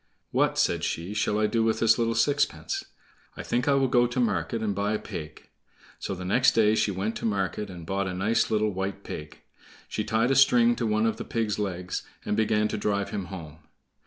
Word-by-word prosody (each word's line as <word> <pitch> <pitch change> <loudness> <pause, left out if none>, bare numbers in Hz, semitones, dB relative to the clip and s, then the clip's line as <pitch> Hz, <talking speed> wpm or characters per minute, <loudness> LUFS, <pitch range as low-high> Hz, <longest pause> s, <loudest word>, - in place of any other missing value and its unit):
"What," - - +2
said - - +1
she, 85 +5 -3
"shall 105 0 0
I 110 - +2
do 115 +1 +1
with 110 0 +1
this 115 +1 +4
little 115 0 +1
sixpence? 145 +5 0 0.5
I - - -5
think 120 +2 -1
I 140 - +4
will 135 -1 +3
go 120 -1 +3
to 120 +1 -3
market 115 -1 0
and 105 -2 0
buy 100 +2 -1
a - - +1
pig." 80 -7 -8 0.5
So 95 - -4
the 90 0 -7
next 125 +8 +4
day 110 -1 +4
she 110 - +2
went 100 +3 -2
to - - -5
market 100 -1 -2
and 90 -3 -9
bought 95 +2 -1
a 90 - -3
nice 105 +5 +1
little 110 -1 +1
white 95 +1 -4
pig. 75 0 -8 0.5
She 105 - -3
tied 110 +4 +1
a - - +3
string 120 -3 +5
to 115 - -1
one 110 +1 +2
of 115 - 0
the - - -5
pig's 110 -3 -2
legs 90 -3 -3 0.2
and - - 0
began 105 0 +2
to - - -3
drive 100 -1 -1
him 100 -3 -3
home. 80 -5 -9
105 Hz, 220 wpm, -27 LUFS, 95-115 Hz, 0.5 s, string